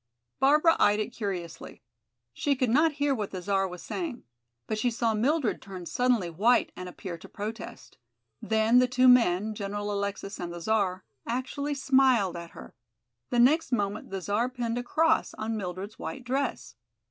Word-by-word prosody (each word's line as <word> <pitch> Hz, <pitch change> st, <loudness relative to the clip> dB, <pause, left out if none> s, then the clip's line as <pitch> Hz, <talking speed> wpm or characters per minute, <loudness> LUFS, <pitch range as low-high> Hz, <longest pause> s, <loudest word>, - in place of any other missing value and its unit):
Barbara 300 Hz, +5 st, +5 dB
eyed 210 Hz, +1 st, +4 dB
it 215 Hz, +3 st, -2 dB
curiously. 185 Hz, -7 st, -6 dB, 0.5 s
She 285 Hz, -1 st, 0 dB
could 255 Hz, -3 st, 0 dB
not 310 Hz, +5 st, +4 dB
hear 285 Hz, -1 st, +1 dB
what 210 Hz, -6 st, -3 dB
the 185 Hz, -, -6 dB
Czar 195 Hz, +1 st, 0 dB
was 180 Hz, -1 st, -9 dB
saying. 320 Hz, -10 st, -5 dB, 0.4 s
But 215 Hz, -, -3 dB
she 245 Hz, -, +2 dB
saw 230 Hz, -1 st, 0 dB
Mildred 255 Hz, +3 st, +1 dB
turn 185 Hz, -3 st, -8 dB
suddenly 235 Hz, +2 st, +1 dB
white 210 Hz, +9 st, +2 dB
and 185 Hz, 0 st, -7 dB
appear 175 Hz, -1 st, -7 dB
to -, -, -13 dB
protest. 215 Hz, -, -7 dB, 0.4 s
Then 220 Hz, +2 st, +3 dB
the 250 Hz, -, +4 dB
two 255 Hz, +1 st, +3 dB
men, 220 Hz, -4 st, +4 dB
General 205 Hz, 0 st, -4 dB
Alexis 200 Hz, 0 st, -4 dB
and 175 Hz, -1 st, -4 dB
the 175 Hz, -, -7 dB
Czar, 190 Hz, -1 st, 0 dB, 0.2 s
actually 280 Hz, +4 st, -2 dB
smiled 260 Hz, -9 st, +3 dB
at 170 Hz, 0 st, -7 dB
her. -, -, -11 dB, 0.6 s
The 245 Hz, -, -1 dB
next 280 Hz, +8 st, +4 dB
moment 205 Hz, -3 st, -1 dB
the 195 Hz, -1 st, -4 dB
Czar 210 Hz, +6 st, 0 dB
pinned 240 Hz, -2 st, -3 dB
a -, -, -4 dB
cross 320 Hz, +6 st, +1 dB
on 220 Hz, +1 st, -3 dB
Mildred's 195 Hz, +1 st, -6 dB
white 265 Hz, -, -6 dB
dress. 245 Hz, -, -2 dB
220 Hz, 170 wpm, -28 LUFS, 195-255 Hz, 0.6 s, Barbara